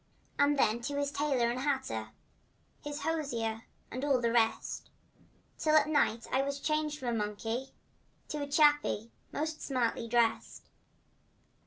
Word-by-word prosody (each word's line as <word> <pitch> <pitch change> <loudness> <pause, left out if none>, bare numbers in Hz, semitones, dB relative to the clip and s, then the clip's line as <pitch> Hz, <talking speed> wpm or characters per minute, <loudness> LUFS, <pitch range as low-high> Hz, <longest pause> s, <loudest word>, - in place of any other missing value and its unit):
And 285 0 +4
then 235 -2 +2
to 285 +4 -3
his 285 0 0
tailor 270 -5 +1
and 245 - -3
hatter— 260 - -1 0.7
His 295 0 -5
hosier 235 -9 -2 0.3
and 255 +3 -4
all 285 -2 +3
of 245 - 0
the 230 - +2
rest, 225 -1 +1 0.7
Till 310 -1 +3
at 305 -1 +6
night 235 -7 +2
I 265 - +3
was 280 +1 -2
changed 305 0 0
from 255 -4 -3
a - - 0
monkey 225 +4 -3 0.6
To 300 -1 -3
a 285 - -3
chappie 295 -6 +3 0.2
most 315 +1 -3
stylishly 240 -3 -1
dressed. 230 -1 +1
270 Hz, 150 wpm, -32 LUFS, 230-295 Hz, 0.7 s, at